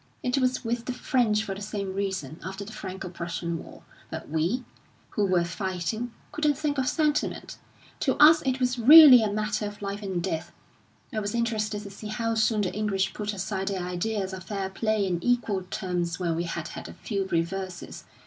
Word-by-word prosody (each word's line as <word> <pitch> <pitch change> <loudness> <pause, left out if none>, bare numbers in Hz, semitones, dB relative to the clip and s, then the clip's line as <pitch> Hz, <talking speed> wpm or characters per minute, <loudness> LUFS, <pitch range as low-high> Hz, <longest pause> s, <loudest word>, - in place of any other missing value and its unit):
It 250 +2 +1
was 255 -1 0
with 235 +1 -2
the 255 - -2
French 230 -4 +1
for 195 - -4
the 195 - -8
same 200 -2 -4
reason, 190 -7 -3
after 195 +2 -6
the 215 - -9
Franco 190 -1 -6
Prussian 170 -1 -4
War. - - -14 0.3
But - - -7
we, 170 - 0 0.5
who 205 -1 +1
were 180 -2 +3
fighting, 190 +6 -3 0.2
couldn't 300 -2 +1
think 290 -2 -1
of 260 - 0
sentiment; 300 -2 -1 0.4
to - - +1
us 315 +2 +7
it 260 -1 0
was 250 -1 0
really 275 0 +10
a 215 -2 0
matter 215 0 -1
of 205 0 -9
life 200 +1 -4
and 190 -3 -2
death, 170 0 -3 0.6
I 220 - 0
was 205 +1 -3
interested 215 -3 -1
to 200 - -9
see 210 +2 -8
how 230 +2 -1
soon 220 -1 +2
the 185 - -1
English 195 -2 0
put 210 0 -3
aside 195 -1 -3
their 190 -3 -2
ideas 190 +2 -2
of 185 -2 -7
fair 195 -1 -3
play 215 0 0
and 175 -2 -2
equal 225 -6 +1
terms 180 -3 -2
when 170 -3 -1
we 170 +1 -1
had 170 -1 -4
had - - -8
a - - -9
few 200 -3 -3
reverses. 180 +1 -3
205 Hz, 195 wpm, -27 LUFS, 185-230 Hz, 0.6 s, really